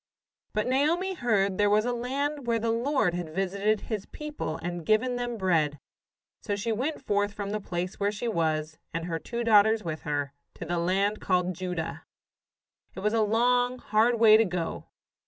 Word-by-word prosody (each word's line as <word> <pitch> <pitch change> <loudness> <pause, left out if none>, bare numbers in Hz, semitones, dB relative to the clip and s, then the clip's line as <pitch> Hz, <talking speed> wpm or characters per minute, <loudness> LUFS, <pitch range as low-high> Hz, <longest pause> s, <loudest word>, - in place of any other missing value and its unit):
] - - -55
But 215 - +1
Naomi 315 +9 +1
heard 210 - +1
there 205 0 +4
was 210 +2 +3
a 245 - 0
land 275 +3 -2
where 230 -1 +2
the 225 0 0
Lord 235 -5 +1
had 175 -3 -5
visited 200 +3 0
His 215 -4 -4
people 300 - -5
and 175 -1 -4
given 225 +6 +2
them 245 -1 -3
bread; 160 -7 +1 0.6
so 205 - -2
she 210 +3 -2
went 265 +6 -2
forth 205 -2 +1
from 200 -1 -4
the 210 0 -2
place 180 -1 -4
where 200 0 +1
she 210 +3 -4
was, 160 -5 -1 0.2
and 165 0 -2
her 165 -2 -3
two 235 +7 -4
daughters 220 0 +5
with 160 -2 -4
her, 145 -2 -2 0.2
to - - -7
the 175 +1 -1
land 195 +4 +1
called 180 -1 +1
Judah. 180 -2 -4 0.9
It 190 - -6
was 210 +2 +1
a 225 - +3
long, 245 +3 +2
hard 230 0 +2
way 220 -1 +8
to 225 - +5
go. 175 -3 -3
210 Hz, 190 wpm, -28 LUFS, 180-235 Hz, 0.9 s, way